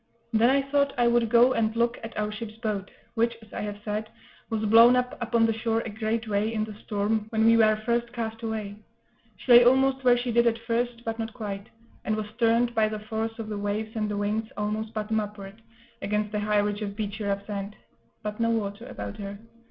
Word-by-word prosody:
Then 225 Hz, +2 st, +5 dB
I 275 Hz, +1 st, +3 dB
thought 280 Hz, 0 st, +1 dB
I 240 Hz, -, +3 dB
would 235 Hz, -1 st, +3 dB
go 240 Hz, +2 st, +6 dB
and 225 Hz, -1 st, 0 dB
look 235 Hz, +1 st, +1 dB
at 225 Hz, -, -7 dB
our 210 Hz, 0 st, -1 dB
ship's 215 Hz, 0 st, -7 dB
boat, 210 Hz, -4 st, -3 dB, 0.2 s
which, 235 Hz, 0 st, +1 dB
as 215 Hz, -, -17 dB
I -, -, -4 dB
have 205 Hz, -1 st, -4 dB
said, 215 Hz, +1 st, -3 dB, 0.4 s
was 220 Hz, -1 st, -1 dB
blown 230 Hz, +3 st, +7 dB
up 250 Hz, 0 st, 0 dB
upon 235 Hz, -1 st, +2 dB
the 225 Hz, -, +2 dB
shore 225 Hz, 0 st, 0 dB
a 225 Hz, -, -6 dB
great 220 Hz, +1 st, -2 dB
way, 210 Hz, +1 st, 0 dB
in 215 Hz, -1 st, -1 dB
the 215 Hz, 0 st, -6 dB
storm, 210 Hz, +1 st, -2 dB
when 220 Hz, 0 st, +1 dB
we 230 Hz, 0 st, +6 dB
were 215 Hz, -1 st, +5 dB
first 235 Hz, 0 st, 0 dB
cast 225 Hz, -1 st, -4 dB
away. 215 Hz, -3 st, -4 dB, 0.6 s
She 250 Hz, -, -2 dB
lay 240 Hz, 0 st, +10 dB
almost 265 Hz, +2 st, +3 dB
where 245 Hz, -1 st, +5 dB
she 245 Hz, 0 st, -2 dB
did 235 Hz, +1 st, +4 dB
at 230 Hz, -1 st, +2 dB
first, 235 Hz, +1 st, -2 dB
but 225 Hz, 0 st, -3 dB
not 225 Hz, -1 st, -4 dB
quite; 200 Hz, -3 st, -6 dB, 0.3 s
and 215 Hz, -, 0 dB
was 215 Hz, -1 st, -3 dB
turned, 235 Hz, +1 st, +3 dB
by 220 Hz, -2 st, +2 dB
the 215 Hz, -, -4 dB
force 220 Hz, +1 st, -4 dB
of 225 Hz, -2 st, -5 dB
the 210 Hz, -1 st, -4 dB
waves 215 Hz, +2 st, -3 dB
and 215 Hz, -1 st, -1 dB
the 205 Hz, -, -2 dB
winds, 215 Hz, +2 st, -1 dB
almost 215 Hz, +1 st, -2 dB
bottom 220 Hz, 0 st, -1 dB
upward, 205 Hz, 0 st, -7 dB, 0.4 s
against 210 Hz, +1 st, -1 dB
a 210 Hz, -, 0 dB
high 210 Hz, 0 st, +1 dB
ridge 205 Hz, +1 st, 0 dB
of 200 Hz, -1 st, -4 dB
beachy, 210 Hz, 0 st, -4 dB
rough 200 Hz, 0 st, -2 dB
sand, 205 Hz, 0 st, -5 dB, 0.5 s
but 210 Hz, +1 st, -4 dB
no 230 Hz, 0 st, +2 dB
water 220 Hz, 0 st, -2 dB
about 100 Hz, 0 st, -7 dB
her. 200 Hz, 0 st, -6 dB
220 Hz, 225 wpm, -26 LUFS, 210-235 Hz, 0.6 s, lay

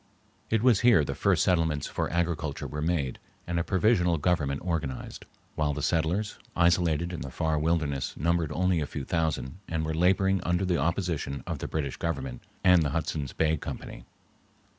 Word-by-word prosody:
It 110 Hz, 0 st, +1 dB
was 125 Hz, -6 st, +5 dB
here 120 Hz, -11 st, +5 dB
the -, -, -3 dB
first -, -, +2 dB
settlements 80 Hz, -5 st, +1 dB
for -, -, -2 dB
agriculture 85 Hz, -4 st, -1 dB
were 75 Hz, 0 st, -4 dB
made 80 Hz, -5 st, -1 dB, 0.3 s
and 85 Hz, 0 st, -1 dB
a -, -, +1 dB
provisional 90 Hz, -3 st, +2 dB
government 75 Hz, -4 st, 0 dB
organized, 80 Hz, -7 st, -3 dB, 0.3 s
while 75 Hz, -2 st, 0 dB
the 75 Hz, -, -4 dB
settlers, 90 Hz, +6 st, 0 dB, 0.2 s
isolated 85 Hz, -1 st, +2 dB
in 80 Hz, -, -5 dB
the 65 Hz, -, -5 dB
far 80 Hz, +4 st, 0 dB
wilderness, 75 Hz, -4 st, -1 dB
numbered 85 Hz, 0 st, +1 dB
only 90 Hz, +1 st, +1 dB
a 75 Hz, -, -2 dB
few 70 Hz, -3 st, -5 dB
thousand 80 Hz, 0 st, -1 dB
and 80 Hz, -1 st, -2 dB
were 80 Hz, -, -2 dB
laboring 95 Hz, +3 st, +3 dB
under 90 Hz, +2 st, 0 dB
the 90 Hz, -2 st, +1 dB
opposition 85 Hz, -3 st, -1 dB
of -, -, -4 dB
the -, -, -4 dB
British 70 Hz, -4 st, -3 dB
Government 65 Hz, -7 st, -3 dB, 0.2 s
and 90 Hz, -2 st, +6 dB
the 75 Hz, -, +1 dB
Hudson's 75 Hz, -2 st, -2 dB
Bay 80 Hz, 0 st, +1 dB
Company. -, -, -7 dB
80 Hz, 175 wpm, -28 LUFS, 75-90 Hz, 0.3 s, and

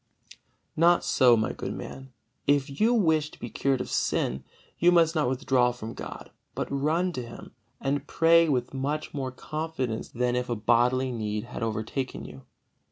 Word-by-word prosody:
Not 170 Hz, +2 st, +4 dB
so, 125 Hz, -3 st, +5 dB
my 110 Hz, -, 0 dB
good -, -, -5 dB
man! 135 Hz, 0 st, -8 dB, 0.4 s
If 140 Hz, +1 st, +1 dB
you 225 Hz, +2 st, +5 dB
wish 160 Hz, -9 st, +2 dB
to -, -, -16 dB
be 120 Hz, -, -7 dB
cured 135 Hz, -2 st, 0 dB
of -, -, -6 dB
sin, 65 Hz, -, 0 dB, 0.4 s
you 175 Hz, +1 st, +5 dB
must 165 Hz, -2 st, +4 dB
not 150 Hz, -6 st, +1 dB
withdraw 130 Hz, -2 st, +2 dB
from 115 Hz, -2 st, -7 dB
God, -, -, -8 dB, 0.2 s
but -, -, -2 dB
run 155 Hz, +6 st, +1 dB
to 130 Hz, -, -4 dB
Him, 120 Hz, -1 st, -10 dB, 0.3 s
and 140 Hz, +1 st, -2 dB
pray 165 Hz, 0 st, +4 dB
with 125 Hz, -3 st, 0 dB
much 145 Hz, +3 st, -3 dB
more 135 Hz, -3 st, -3 dB
confidence 130 Hz, -5 st, -4 dB
than 125 Hz, 0 st, 0 dB
if 125 Hz, 0 st, -2 dB
a 120 Hz, -, 0 dB
bodily 120 Hz, +4 st, +2 dB
need 105 Hz, -3 st, -3 dB
had 120 Hz, -, -8 dB
overtaken 115 Hz, +4 st, -3 dB
you. 70 Hz, -2 st, -11 dB
130 Hz, 170 wpm, -27 LUFS, 120-155 Hz, 0.4 s, so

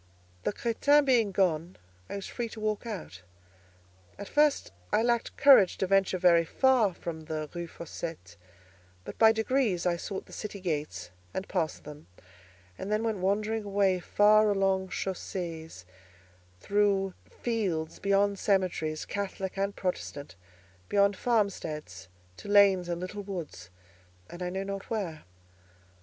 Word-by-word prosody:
The -, -, +2 dB
crétin 280 Hz, +7 st, +3 dB
being 235 Hz, -6 st, +3 dB
gone, 175 Hz, -2 st, 0 dB, 0.3 s
I -, -, -5 dB
was 200 Hz, -, -5 dB
free 235 Hz, -2 st, -4 dB
to 220 Hz, -, -9 dB
walk 215 Hz, +1 st, -2 dB
out. 175 Hz, -, -7 dB, 1.0 s
At 200 Hz, -, -7 dB
first 295 Hz, -1 st, +2 dB, 0.2 s
I 220 Hz, -, +3 dB
lacked 235 Hz, -1 st, 0 dB
courage 270 Hz, -10 st, +7 dB
to -, -, 0 dB
venture 195 Hz, 0 st, +2 dB
very 170 Hz, -2 st, +5 dB
far 230 Hz, 0 st, +2 dB
from 160 Hz, -2 st, -6 dB
the 155 Hz, -1 st, -4 dB
Rue 170 Hz, -1 st, -5 dB
Fossette, 160 Hz, -, -8 dB, 0.7 s
but -, -, -9 dB
by 220 Hz, -1 st, +8 dB
degrees 220 Hz, -5 st, 0 dB
I 175 Hz, -1 st, +2 dB
sought 190 Hz, +3 st, -5 dB
the -, -, -15 dB
city 210 Hz, -2 st, -6 dB
gates, 150 Hz, -, -4 dB, 0.2 s
and 190 Hz, -, -3 dB
passed 165 Hz, -5 st, -2 dB
them, 150 Hz, +1 st, -11 dB, 0.7 s
and 200 Hz, -, -5 dB
then 215 Hz, +1 st, +1 dB
went 220 Hz, -3 st, -1 dB
wandering 210 Hz, +4 st, 0 dB
away 195 Hz, -2 st, +1 dB
far 210 Hz, +3 st, +4 dB
along 195 Hz, -1 st, +1 dB
chaussées, 170 Hz, -, -5 dB, 0.7 s
through 200 Hz, -, +1 dB, 0.2 s
fields, 190 Hz, -10 st, -2 dB
beyond 200 Hz, 0 st, +2 dB
cemeteries, 180 Hz, -6 st, 0 dB
Catholic 195 Hz, -1 st, -4 dB
and 195 Hz, +1 st, -1 dB
Protestant, 145 Hz, -, -4 dB, 0.5 s
beyond 200 Hz, 0 st, +3 dB
farmsteads, 160 Hz, -, -2 dB, 0.3 s
to -, -, -10 dB
lanes 200 Hz, -3 st, +5 dB
and 170 Hz, 0 st, -2 dB
little 185 Hz, +3 st, -5 dB
woods, 170 Hz, -, -7 dB, 0.6 s
and 175 Hz, -, -9 dB
I 180 Hz, -, -2 dB
know 190 Hz, +2 st, -3 dB
not 195 Hz, 0 st, -6 dB
where. 185 Hz, -9 st, -4 dB
195 Hz, 140 wpm, -29 LUFS, 170-210 Hz, 1.0 s, by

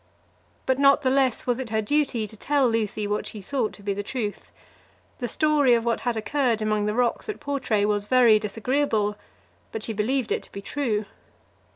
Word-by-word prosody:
But 260 Hz, 0 st, +1 dB
not 275 Hz, 0 st, +5 dB
the 260 Hz, -, +2 dB
less 265 Hz, -3 st, +1 dB
was 245 Hz, 0 st, 0 dB
it 255 Hz, -3 st, -5 dB
her 220 Hz, 0 st, 0 dB
duty 250 Hz, 0 st, 0 dB
to 220 Hz, -, -11 dB
tell 280 Hz, +4 st, +1 dB
Lucy 215 Hz, -2 st, -1 dB
what 205 Hz, +1 st, -2 dB
she 215 Hz, -, -8 dB
thought 230 Hz, +2 st, -2 dB
to 205 Hz, -, -14 dB
be 200 Hz, 0 st, -1 dB
the 200 Hz, -, -3 dB
truth. 210 Hz, -1 st, -5 dB, 0.7 s
The 245 Hz, -, -2 dB
story 290 Hz, -1 st, +3 dB
of 230 Hz, 0 st, -1 dB
what 235 Hz, -1 st, +1 dB
had 240 Hz, -2 st, -2 dB
occurred 230 Hz, +1 st, 0 dB
among 215 Hz, -1 st, 0 dB
the 210 Hz, -, -1 dB
rocks 245 Hz, -, 0 dB
at 425 Hz, -, -4 dB
Portray 260 Hz, -7 st, 0 dB
was 205 Hz, -1 st, 0 dB
very 240 Hz, -4 st, +5 dB
disagreeable, 215 Hz, 0 st, 0 dB, 0.6 s
but 220 Hz, -, -5 dB
she 225 Hz, -, -2 dB
believed 225 Hz, +3 st, -1 dB
it -, -, 0 dB
to -, -, -18 dB
be -, -, -7 dB
true. 220 Hz, -7 st, -1 dB
230 Hz, 200 wpm, -25 LUFS, 210-265 Hz, 0.7 s, not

